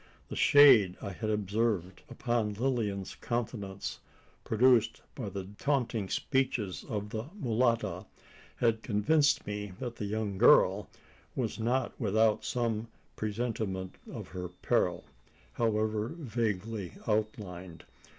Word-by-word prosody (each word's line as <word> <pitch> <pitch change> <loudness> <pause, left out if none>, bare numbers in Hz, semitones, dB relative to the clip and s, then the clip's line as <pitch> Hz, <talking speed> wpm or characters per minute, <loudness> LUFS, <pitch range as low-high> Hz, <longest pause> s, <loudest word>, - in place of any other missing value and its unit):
The - - -5
shade 125 -11 +7
I 100 - -5
had 110 +4 -4
observed 105 -3 -1
upon 120 -4 -1
Lilian's 110 -5 -1
countenance 105 -5 -4 0.4
produced 120 0 +3
by 115 -7 -5
the 95 0 -5
taunting 120 -8 0
speeches 130 -8 -1
of 105 -1 -3
the 110 0 -3
mulatta 120 - 0 0.5
had 115 -2 +1
convinced 140 +9 +2
me 105 -1 -5
that 120 -2 -5
the 105 - -3
young 105 -2 -2
girl - - +5 0.5
was 115 -3 -2
not 120 +3 0
without 110 0 +2
some 115 -2 -1 0.3
presentiment 105 -4 -3 0.2
of - - -7
her 90 -1 -5
peril, 90 - 0 0.5
however 110 -1 0
vaguely 110 - -2
outlined. 100 -5 -3
110 Hz, 110 wpm, -31 LUFS, 100-120 Hz, 0.5 s, shade